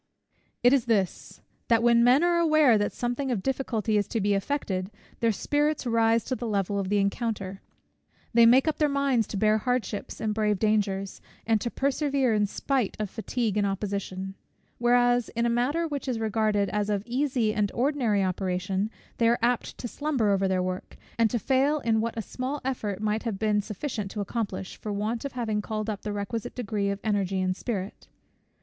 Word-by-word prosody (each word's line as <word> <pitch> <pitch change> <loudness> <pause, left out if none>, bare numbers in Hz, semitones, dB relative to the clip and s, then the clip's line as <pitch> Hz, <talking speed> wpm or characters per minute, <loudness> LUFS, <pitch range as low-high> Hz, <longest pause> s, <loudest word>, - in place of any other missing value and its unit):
It 245 +2 +6
is 270 -4 +3
this 205 -6 -1 0.3
that 230 -1 +3
when 235 0 +5
men 255 +6 +5
are 345 -1 +3
aware 310 -7 +5
that 205 -1 +1
something 245 +3 -2
of 220 -7 -1
difficulty 230 -5 0
is 205 - -1
to 230 - -2
be 205 0 +2
effected, 195 -4 -2 0.3
their 230 -1 +3
spirits 295 +7 0
rise 230 -1 +3
to 255 - -2
the 240 - -4
level 200 -1 0
of 190 -1 -2
the 205 - +2
encounter; 200 -1 -2 0.7
they 230 0 +7
make 260 +5 +5
up 315 - 0
their 300 -1 +3
minds 275 -5 +1
to 205 - -4
bear 215 +2 +3
hardships 235 -4 -2
and 215 -1 -1
brave 210 -1 +1
dangers, 200 -2 0 0.2
and 220 -2 +2
to 235 - -1
persevere 275 -2 +1
in 210 -1 +2
spite 255 +1 -1
of 210 -3 -3
fatigue 225 -2 -2
and 205 -1 +2
opposition: 195 -1 -3 0.5
whereas 245 0 +3
in 235 +1 +1
a 235 - +2
matter 280 +8 +1
which 285 -3 -4
is 250 -3 -1
regarded 215 -2 +1
as 210 0 -1
of 205 -1 0
easy 245 -3 0
and 210 -2 0
ordinary 240 -6 +1
operation, 185 +2 -1 0.3
they 230 -1 +4
are 235 - +3
apt 245 0 0
to 245 - -5
slumber 265 -6 0
over 195 -1 +2
their 185 -1 +1
work, 185 0 -5 0.2
and 230 -1 +4
to 240 - 0
fail 270 +6 +2
in 225 -2 +2
what 230 0 -3
a 225 - -2
small 260 +7 -4
effort 210 -6 -3
might 215 +1 0
have 225 -5 -3
been 210 0 +1
sufficient 210 0 -4
to 210 - -6
accomplish, 200 -2 -3
for 215 - -5
want 215 +5 -2
of 280 - -4
having 220 -4 -1
called 215 +1 -3
up 205 - -6
the 210 - -4
requisite 205 +2 -4
degree 210 -4 -1
of 200 0 -2
energy 195 -3 0
and 185 0 0
spirit. 200 -3 -5
220 Hz, 195 wpm, -27 LUFS, 205-245 Hz, 0.7 s, they